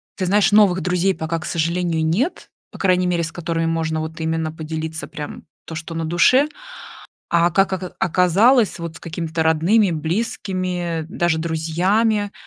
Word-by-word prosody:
ты 185 - -2
знаешь, 200 +3 +3
новых 200 -3 +5
друзей 180 +3 +1
пока, 165 -1 -3
к 160 - -8
сожалению, 170 0 -1
нет. 215 - -1 0.2
По - - -12
крайней 185 -1 +2
мере, 175 -1 0
с 165 - -3
которыми 165 -1 -2
можно 160 -1 -1
вот 160 +1 -6
именно 160 0 -1
поделиться 160 0 -5
прям 150 -1 -8 0.2
то, 160 - -7
что 165 +1 -6
на 165 0 -3
душе. 255 - +4 0.8
А 170 0 +3
как 195 +3 +2
ока 185 -1 -4
оказалось, 190 +7 +3
с 170 -1 -7
какими-то 165 -1 -3
родными, 170 +6 +3
близкими, 175 -1 -2
даже 175 -1 0
друзьями, 185 +7 0
170 Hz, 155 wpm, -20 LUFS, 160-190 Hz, 0.8 s, новых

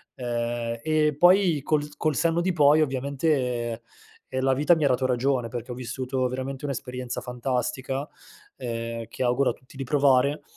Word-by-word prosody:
Ehm, 120 -1 -3
e 155 -2 +2
poi 175 -2 +5
col 150 0 0
col 155 -3 0
senno 165 +3 +2
di 185 +1 0
poi 150 0 +5
ovviamente 130 -4 -1 0.5
e 130 - 0
la 135 0 +3
vita 150 +6 +4
mi 155 - +1
ha - - +5
dato 130 0 +1
ragione, 125 -1 +1
perché 120 +1 -6
ho - - -5
vissuto 130 +1 -3
veramente 130 +2 -5
un'esperienza 125 -2 -4
fantastica, 130 +2 -3 0.5
ehm, 115 -2 -4
che - - -4
auguro 125 +2 +2
a - - -6
tutti 130 +2 -20
di 135 - -3
provare, 140 +1 +3
130 Hz, 165 wpm, -26 LUFS, 125-145 Hz, 0.5 s, poi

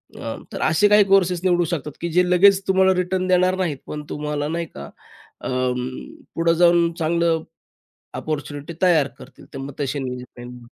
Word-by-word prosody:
उम्म - - -7
तर - - -5
असे 160 +6 +3
काही 210 0 +6
कोर्सेस 185 -3 +3
निवडू 175 -2 +3
शकतात 150 -2 -3
की 170 - -2
जे 180 +3 +4
लगेच 190 +2 +5
तुम्हाला 190 0 +4
रिटर्न 185 +1 -1
देणार 185 0 +3
नाहीत 170 -7 -1
पण 150 0 -6
तुम्हाला 150 0 -3
नाही 170 +1 -2
का 70 - -10 0.5
अ, - - -5 0.9
पुढं 165 0 +2
जाऊन 170 -1 +4
चांगलं 165 0 +1 0.7
अपॉर्च्युनिटी 145 0 -5
तयार 165 -6 +4
करतील - - -14
तर - - -5
मग 135 +1 -6
तसे 140 0 -2
निवडता 125 -1 -7
येतील. 125 0 -10
170 Hz, 170 wpm, -22 LUFS, 150-180 Hz, 0.9 s, काही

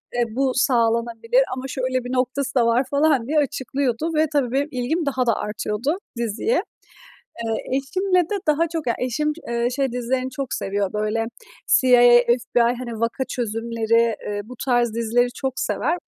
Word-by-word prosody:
eee, 240 - +2
bu 270 0 +2
sağlanabilir 235 - +2
ama 255 - -5
şöyle 255 -1 -2
bir 245 +1 -5
noktası 260 +2 -1
da 240 - +4
var, 235 +3 +3
falan, 280 -4 +2
diye 305 +2 +2
açıklıyordu 275 +1 -1
ve 310 +1 +3
tabii 265 -5 +1
benim 275 +3 +1
ilgim 275 +6 -1
daha 260 -2 0
da 230 - +3
artıyordu 210 - -2 0.2
diziye. 235 - 0 0.9
Eee, 225 +3 -2
eşimle 365 +7 +1
de 355 +5 -2
daha 315 +2 +2
çok, 325 -4 -4
yani, 235 - +1
eşim, 300 +5 0 0.2
eee, 235 0 0
şey 270 -1 -1
dizilerini 255 +1 -1
çok 255 -2 -4
seviyor, 200 -1 -2
böyle, 215 +2 -1 0.4
CIA, 250 -2 +5 0.2
FBI, 240 0 +1 0.2
hani, 235 -3 -6
vaka 230 +3 -1
çözümleri, 230 -1 0
eee, 205 0 -3
bu 250 - -10
tarz 240 -3 +2
dizileri 240 +2 +1
çok 265 -1 -2
sever. 340 +3 0
250 Hz, 165 wpm, -22 LUFS, 230-275 Hz, 0.9 s, CIA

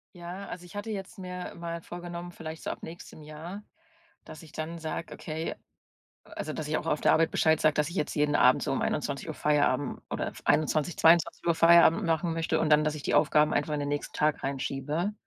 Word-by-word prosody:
Ja, 175 +3 -7
also, 180 0 -8
ich 180 - -13
hatte 210 +2 -4
jetzt 200 +1 -6
mir 180 -1 -6
mal 170 0 -5
vorgenommen, 175 +1 -7
vielleicht 160 -1 -8
so - - -6
ab - - -6
nächstem 160 -1 -10
Jahr, 160 +7 -8 0.6
dass 155 +1 -11
ich 155 - -14
dann 160 +3 -5
sage: 160 +1 -5
„Okay“ 160 +1 -4 0.7
also, 155 - -6
dass 155 0 -5
ich 155 - 0
auch - - -5
auf 150 - 0
der - - +4
Arbeit 165 0 +3
Bescheid 160 -1 +3
sage, 155 -1 +4
dass 150 +1 +1
ich 175 - -9
jetzt 150 - -1
jeden 150 0 +1
Abend 125 +1 +5
so - - -1
um - - -1
21:00 - - -2
Feierabend 145 -3 +1
oder - - -2
f - - -8
21:00, 155 +1 +1
22:00 170 0 +4
Feierabend 170 +3 +6
machen 165 0 0
möchte 165 0 0
und 155 - +1
dann, 150 0 +5
dass 155 0 0
ich 145 - -8
die - - -1
Aufgaben 150 0 +4
einfach 145 +1 0
in 145 - -1
den 145 - -2
nächsten 145 0 -3
Tag 150 0 +1
reinschiebe. 140 +7 -2
160 Hz, 215 wpm, -28 LUFS, 150-170 Hz, 0.7 s, Feierabend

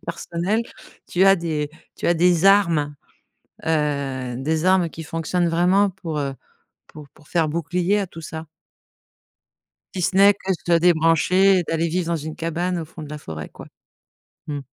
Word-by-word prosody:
personnelles, 175 +6 -2 0.5
tu 185 +2 +2
as 195 0 +6
des 155 -4 -3 0.3
tu - - -4
as 175 - +4
des 175 +1 +3
armes, 170 -7 +4 0.7
heu, 140 -5 -1
des 155 +5 -1
armes 185 -2 +3
qui 165 - -8
fonctionnent 165 +2 -1
vraiment 185 +4 +3
pour, 170 -5 -5
heu, 140 -1 -2 0.5
pour 150 -2 -12
pour 150 - -21
faire 165 -3 +1
bouclier 175 +5 0
à 195 - -2
tout 165 -1 -11
ça? 160 +1 -7 1.5
Si 185 - -3
ce 180 +2 0
n'est 200 +1 +7
que 195 -1 -7
de 175 -1 -3
se 170 - +6
débrancher 175 +3 +4
et 180 - +1
d'aller 165 +1 -1
vivre 175 +1 -1
dans 170 - 0
une 155 0 -6
cabane 170 +2 -2
au 165 - -4
fond 160 +1 -11
de 150 - -9
la 150 - -6
forêt, 80 - -8
quoi. - - -12 0.8
Mmh. 145 -2 -3
165 Hz, 175 wpm, -22 LUFS, 155-180 Hz, 1.5 s, n'est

